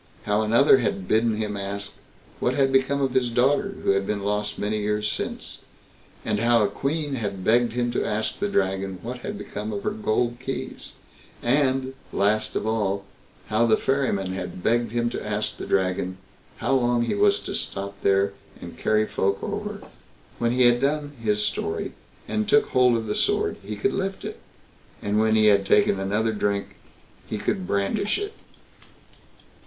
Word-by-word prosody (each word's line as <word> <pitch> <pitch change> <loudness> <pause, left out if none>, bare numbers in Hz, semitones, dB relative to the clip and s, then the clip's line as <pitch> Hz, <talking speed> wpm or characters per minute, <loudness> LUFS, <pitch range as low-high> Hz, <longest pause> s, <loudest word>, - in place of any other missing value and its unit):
—how 105 +1 +1
another 120 +5 +5
had 100 -5 -2
bidden 110 0 +2
him 105 -1 -2
ask, 100 0 -5 0.4
what 125 - +1
had 135 -1 +3
become 135 +1 +2
of 130 -2 0
his 130 -2 +2
daughter, 140 - +2
who - - +3
had 100 0 +1
been 100 -1 -2
lost 105 +1 -1
many 105 +1 -1
years 105 0 0
since?—and 105 - -6
how 115 0 +4
a - - +3
queen 145 0 -2
had 100 -6 -3
begged 115 +2 +3
him 120 0 0
to 120 - 0
ask 110 0 -2
the 205 - 0
Dragon 95 - 0
what 125 +2 -5
had 110 - -5
become 105 +1 -5
of 100 -1 -4
her - - 0
gold 120 +2 0
keys?—and, 130 0 -2 0.2
last 105 +2 +1
of - - -1
all, 100 -3 0 0.4
how 110 +2 +3
the 110 - +4
ferryman 110 -9 0
had 90 -1 -6
begged 120 -1 +2
him 120 0 0
to - - -4
ask - - -2
the - - -6
Dragon, 95 -1 0 0.4
how - - 0
long 120 -2 +2
he 120 - -1
was 205 0 +3
to - - -6
stop 100 0 -3
there 100 0 +3 0.3
and - - -10
carry 110 0 +2
folk 100 -2 0
over?? - - -4 0.6
When 115 0 +1
he 125 +1 +3
had 120 0 +5
done 145 +1 0
his 105 -1 +1
story, - - -2 0.3
and 215 0 -1
took 215 0 +4
hold 125 -2 +4
of 110 - -3
the 105 - -1
sword, - - +1
he 105 +2 -5
could 100 - 0
lift 195 0 -3
it; - - -6 0.6
and 105 +1 0
when 110 0 +3
he 110 0 +5
had 100 -2 +5
taken 95 0 +3
another 105 +3 0
drink, 100 -1 -1 0.6
he - - -3
could 95 -1 -2
brandish 200 - 0
it. 410 +1 -4
110 Hz, 175 wpm, -25 LUFS, 100-125 Hz, 0.6 s, another